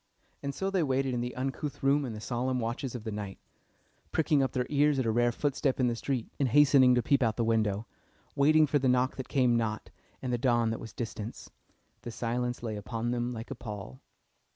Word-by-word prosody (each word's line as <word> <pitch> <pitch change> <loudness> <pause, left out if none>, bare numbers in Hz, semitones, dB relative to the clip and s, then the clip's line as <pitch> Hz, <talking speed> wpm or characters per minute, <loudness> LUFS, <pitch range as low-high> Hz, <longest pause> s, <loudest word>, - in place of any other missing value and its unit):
And 140 -1 -4
so 195 0 -2
they 190 -2 +2
waited 135 -3 0
in 120 - -1
the 125 +1 -4
uncouth 135 +3 -4
room 140 +1 +3
in 120 - -5
the 105 - -6
solemn 125 +3 -1
watches 120 +3 -3
of 120 - -6
the 110 - -4
night, 105 -2 -5 0.7
pricking 155 -3 +2
up 135 -2 +1
their 125 -1 0
ears 145 0 +3
at 130 - 0
a 115 - +2
rare 120 +1 +3
footstep 135 +1 -1
in 130 - +3
the 120 -1 +1
street, 125 0 -2
and 135 -3 +2
hastening 135 -1 +6
to 120 - +2
peep 140 -1 +2
out 115 -3 +2
of - - -31
the 120 - 0
window; 110 -2 +1 0.5
waiting 155 +2 +5
for 145 0 +1
the 130 -1 +2
knock 125 +1 +2
that 130 - -6
came 125 -3 +3
not, 110 -2 -2 0.3
and 125 -2 -3
the 120 - 0
dawn 120 -3 +2
that 115 - -3
was 115 - -8
distant. 110 -1 -6 0.5
The - - -6
silence 120 +1 -2
lay 110 -3 -3
upon 115 +3 -3
them 120 0 -1
like 115 +2 -7
a - - -3
pall. 105 - -8
125 Hz, 225 wpm, -30 LUFS, 115-135 Hz, 0.7 s, hastening